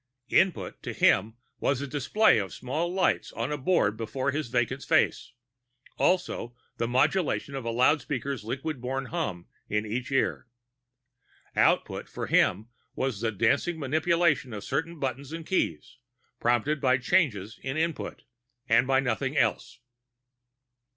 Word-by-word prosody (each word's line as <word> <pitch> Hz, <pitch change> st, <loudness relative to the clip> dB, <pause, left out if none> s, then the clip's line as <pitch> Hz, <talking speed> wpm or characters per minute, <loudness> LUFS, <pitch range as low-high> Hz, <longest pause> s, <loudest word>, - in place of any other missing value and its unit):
Input 165 Hz, -, +1 dB
to -, -, -5 dB
him 110 Hz, +4 st, +3 dB, 0.2 s
was 135 Hz, -2 st, +1 dB
a 140 Hz, -, -3 dB
display 145 Hz, -, +3 dB
of 95 Hz, -3 st, -4 dB
small 155 Hz, +7 st, -2 dB
lights 185 Hz, 0 st, +1 dB
on 115 Hz, +5 st, -3 dB
a 150 Hz, -, -1 dB
board 130 Hz, -, +2 dB
before 130 Hz, +5 st, -2 dB
his 150 Hz, -1 st, -2 dB
vacant 120 Hz, -1 st, 0 dB
face; -, -, +1 dB, 0.6 s
and -, -, -11 dB
also 175 Hz, -9 st, +1 dB, 0.2 s
the 115 Hz, -, -1 dB
modulation 140 Hz, +4 st, +1 dB
of 135 Hz, -3 st, -5 dB
a -, -, -1 dB
loudspeaker's 135 Hz, 0 st, +1 dB
liquid 135 Hz, +4 st, -4 dB
borne 135 Hz, +2 st, -2 dB
hum 125 Hz, -, -3 dB, 0.2 s
in 105 Hz, +1 st, 0 dB
each 120 Hz, +5 st, -4 dB
ear. 135 Hz, -1 st, 0 dB, 1.1 s
Output -, -, +2 dB
from -, -, -5 dB
him 105 Hz, +5 st, +2 dB, 0.3 s
was 130 Hz, -6 st, -2 dB
the 115 Hz, -1 st, 0 dB
dancing 140 Hz, -, +1 dB
manipulation 155 Hz, -2 st, +1 dB
of 105 Hz, -1 st, -6 dB
certain 165 Hz, +2 st, -2 dB
buttons 135 Hz, +1 st, -3 dB
and 165 Hz, 0 st, -6 dB
keys, 130 Hz, -, -1 dB, 0.4 s
prompted 120 Hz, +5 st, +1 dB
by 130 Hz, -1 st, +4 dB
changes 125 Hz, -, +1 dB
in 135 Hz, +2 st, -3 dB
Input 165 Hz, 0 st, -2 dB, 0.4 s
and 120 Hz, +3 st, +4 dB
by 135 Hz, 0 st, +3 dB
nothing 135 Hz, +3 st, -1 dB
else. -, -, 0 dB
130 Hz, 145 wpm, -27 LUFS, 115-155 Hz, 1.1 s, by